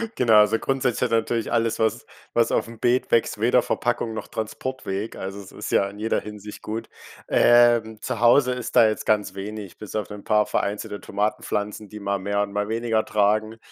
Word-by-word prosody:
Genau, 115 -3 +4
also, 105 +1 +5
grundsätzlich 130 -3 -1
hat 125 - 0
ja 115 - +4
natürlich 115 0 -1
alles, 115 -1 +1
was 110 -2 0 0.3
was 115 -1 +2
aufm 115 -1 -2
Beet 125 +2 +1
wächst, 115 -2 +2
weder 120 +3 +4
Verpackung 120 -2 -1
noch 110 - -6
Transportweg. 110 -2 -4
Also, 95 +1 -6
es 100 - -11
ist - - -7
ja 100 - +2
in 100 +1 -12
jeder 110 +1 0
Hinsicht 105 0 -9
gut. 110 +2 -5 0.4
Ähm, 120 -2 +4
zu 125 -3 -3
Hause 125 +2 +5
ist 125 -1 -6
da 110 - +7
jetzt 110 - -2
ganz 105 -1 +1
wenig 100 0 -7
bis 105 - -9
auf 105 -2 -2
'nen 105 -1 -9
paar 105 -1 +3
vereinzelte 105 +1 -3
Tomatenpflanzen, 105 0 -3
die 105 - -9
mal 100 0 -1
mehr 100 +2 -1
und 100 -1 -3
mal 105 0 -1
weniger 115 -1 0
tragen, 110 +1 +1
110 Hz, 195 wpm, -24 LUFS, 105-115 Hz, 0.4 s, da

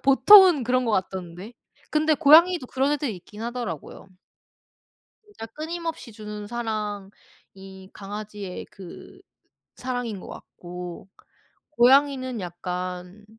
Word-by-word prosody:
보통은 350 +2 +7
그런 255 +1 +1
것 230 - -1
같던데 185 +1 -4 0.4
근데 310 0 +2
고양이도 325 0 +5
그런 270 +3 0
애들이 275 -9 -3
있긴 210 +5 -12
하더라고요. 235 - -6 1.2
진짜 415 - -10
끊임없이 320 0 -6
주는 210 -1 -8
사랑이 205 -3 -8
강아지의 205 -1 -8
그 190 -3 -13 0.6
사랑인 245 -5 -4
거 - - -12
같고 180 +1 -10 0.6
고양이는 260 -2 +3
약간 180 +2 -6
225 Hz, 245 characters per minute, -24 LUFS, 190-275 Hz, 1.2 s, 보통은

